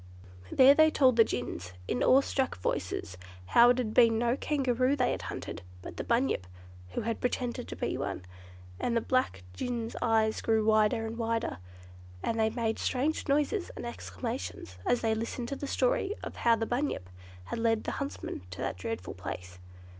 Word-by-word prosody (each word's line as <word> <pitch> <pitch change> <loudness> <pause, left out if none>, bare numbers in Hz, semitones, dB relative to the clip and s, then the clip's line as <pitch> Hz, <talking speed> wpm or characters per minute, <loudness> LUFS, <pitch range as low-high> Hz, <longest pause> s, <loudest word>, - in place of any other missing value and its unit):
There 265 +1 +8
they 315 +2 +6
told 260 -5 +4
the 230 - +7
gins, 90 - -4
in - - -1
awe 265 +2 +6
struck 265 -1 -1
voices, 90 0 -3 0.3
how 235 - +6
it 245 - +4
had 225 -4 -1
been 230 -2 +6
no 240 +2 +2
Kangaroo 265 -2 +1
they 255 -3 +2
had - - -3
hunted, - - -6 0.2
but - - -8
the - - -2
"Bunyip", 235 - +1 0.5
who - - -1
had 230 +1 -3
pretended 245 0 -2
to - - -6
be - - -2
one. 90 - -4 0.5
And 235 -1 0
the - - +2
black 255 - 0
gins' 235 - -3
eyes 220 -2 +2
grew 220 -1 +2
wider 220 +1 +3
and 225 +1 -5
wider, 230 - -1 0.6
and 225 - -1
they 220 0 +3
made 225 -1 -1
strange 290 +6 0
noises 300 +7 +1
and - - -6
exclamations, 235 - -5
as 245 - +3
they 225 -1 +2
listened 230 +2 -3
to 275 - -2
the 285 - -5
story 275 +11 +1
of - - -7
how 235 -1 +4
the 225 0 -2
"Bunyip" 245 - -2 0.4
had 90 - -5
led 225 -1 +2
the - - -2
huntsmen 280 - -4
to 85 - -9
that - - -3
dreadful 95 -1 -4
place. 90 -1 -7
235 Hz, 185 wpm, -30 LUFS, 220-255 Hz, 0.6 s, There